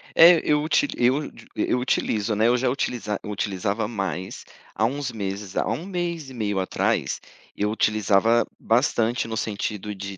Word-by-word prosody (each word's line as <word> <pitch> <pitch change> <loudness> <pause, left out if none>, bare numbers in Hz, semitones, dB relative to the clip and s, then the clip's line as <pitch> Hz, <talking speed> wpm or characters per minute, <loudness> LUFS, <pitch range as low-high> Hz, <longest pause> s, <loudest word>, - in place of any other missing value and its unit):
É, 170 0 +8
eu 150 0 +2
uti 165 - +2
eu 130 +5 +2 0.2
eu - - +1
utilizo, 110 -4 0
né, 110 +2 +3
eu 125 +1 +4
já 130 +1 +1
utiliza 120 -5 -2
utilizava 100 +1 -2
mais, 95 -4 -4 0.3
há 110 - +1
uns 135 +1 -2
meses 100 -2 -5
há - - 0
1 170 - -2
mês 175 -6 -3
e - - -10
meio 105 -5 -1
atrás, 95 - 0 0.4
eu 105 - 0
utilizava 110 +1 +3
bastante 115 -1 +1
no 110 0 -4
sentido 105 -1 -3
de 100 0 -7
110 Hz, 160 wpm, -24 LUFS, 100-130 Hz, 0.4 s, É